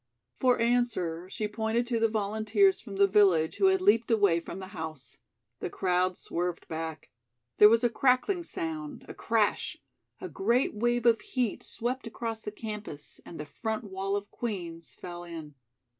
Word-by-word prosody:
For 255 -1 +3
answer 230 -8 0
she 210 +2 -3
pointed 220 +2 -1
to 235 -1 -1
the 225 0 +3
volunteers 220 - +2
from 205 -5 -9
the 200 +1 +5
village 190 -6 +4
who 390 - +3
had 380 0 +3
leaped 230 - +4
away 200 -7 +4
from 170 - -8
the 190 -1 -8
house. 155 -7 -7 0.4
The - - -3
crowd 180 0 +1
swerved 175 0 -3
back. 160 -2 -5 0.5
There 210 - +10
was 230 +2 +3
a 240 - +4
crackling 270 - +2
sound, 160 - -5
a - - -7
crash; 225 -2 0 0.4
a - - -5
great 235 +7 +1
wave 240 +2 0
of 230 -2 +5
heat 245 -6 -2
swept 245 +2 -3
across 225 -1 -4
the 210 - -5
campus 210 -9 -7
and 165 - -9
the 150 - -4
front 220 +8 -4
wall 195 0 -3
of 205 0 -4
Queen's 175 -8 -5
fell 175 -1 -8
in. 165 -3 -8
210 Hz, 170 wpm, -29 LUFS, 175-235 Hz, 0.5 s, There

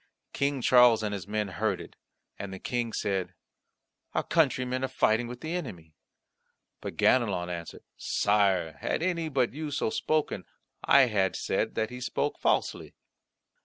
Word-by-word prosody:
King 140 -2 -1
Charles 125 -3 +6
and 105 -1 -2
his 100 -1 -5
men 105 -1 -2
heard 85 -2 -1
it, - - -11 0.4
and 100 -1 -5
the 95 - -6
King 120 +3 -2
said, 95 -3 -2 0.8
"Our - - +1
countrymen 130 -5 +1
are - - +1
fighting 120 -2 +1
with 125 +1 -8
the 160 +1 -4
enemy." 90 - -6 0.9
But - - -6
Ganelon 95 -8 +2
answered, 85 -1 -7
"Sire, 95 -7 +1
had - - -1
any 170 -3 -1
but 130 -5 +1
you 155 +1 -4
so 145 +9 -1
spoken, 155 - -1 0.4
I 140 - +6
had 105 -7 +2
said - - -1
that 110 +1 -1
he 125 0 -8
spoke - - -2
falsely." - - 0
120 Hz, 155 wpm, -28 LUFS, 100-135 Hz, 0.9 s, Charles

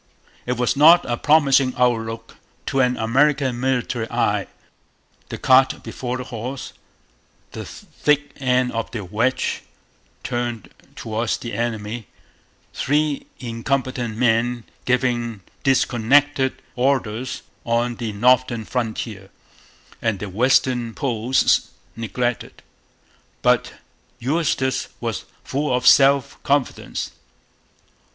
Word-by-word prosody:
It 125 0 -1
was 125 0 +1
not 165 +5 +7
a 120 - -1
promising 140 -2 +3
outlook 115 -2 -1 0.3
to 135 - -1
an 125 -1 +2
American 135 +2 +2
military 125 -3 -1
eye - - 0 0.8
the - - -5
cart 130 +1 +4
before 125 0 -4
the 130 - -5
horse, 125 +3 -6 0.8
the - - -7
thick 150 0 -1
end 125 -2 +1
of 115 -1 -3
the 115 -4 -5
wedge 115 +8 0 0.6
turned 120 -4 -3 0.2
towards 110 +1 -2
the 120 - -7
enemy, 110 0 -3 0.7
three 150 0 0
incompetent 120 -1 -2
men 120 0 +1 0.2
giving 120 -4 0 0.2
disconnected 135 +1 +2 0.2
orders 130 -2 -1 0.2
on 120 0 0
the 115 -3 -3
northern 120 +1 +2
frontier, 110 -5 -4 0.7
and 115 -3 0
the 100 +1 -6
western 120 +2 +2
posts 125 -2 +1 0.3
neglected. 115 +2 -3 0.8
But - - +2 0.4
Eustis 135 -1 0
was - - -3 0.2
full 140 +1 -2
of 125 0 0
self 140 +1 +5
confidence. 140 -2 -1
125 Hz, 100 wpm, -22 LUFS, 115-135 Hz, 0.8 s, not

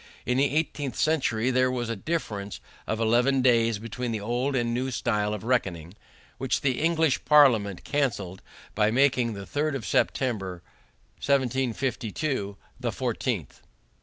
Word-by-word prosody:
In 125 +1 +1
the 140 0 +2
eighteenth 145 -4 -1
century 130 -6 +1
there 130 0 +3
was 125 -2 -2
a 115 - -2
difference 105 - -4 0.3
of 110 - -1
eleven 120 +4 +3
days 115 -3 +3
between 115 +3 -4
the 110 - -2
old 120 +6 -1
and 120 -2 0
the - - -1
new 130 +2 -1
style 105 -4 0
of 105 -1 -4
reckoning, 95 -9 -1 0.5
which 130 0 0
the 130 -3 0
English 160 -3 +2
Parliament 115 - +4
canceled 105 -11 -2 0.3
by 105 0 +2
making 125 -1 +2
the 100 -1 -7
3rd 150 +4 -1
of 120 -6 -5
September, 95 -9 -1 0.6
1752, 130 -3 -1 0.2
the - - -1
14th. - - -3
125 Hz, 145 wpm, -26 LUFS, 110-135 Hz, 0.6 s, Parliament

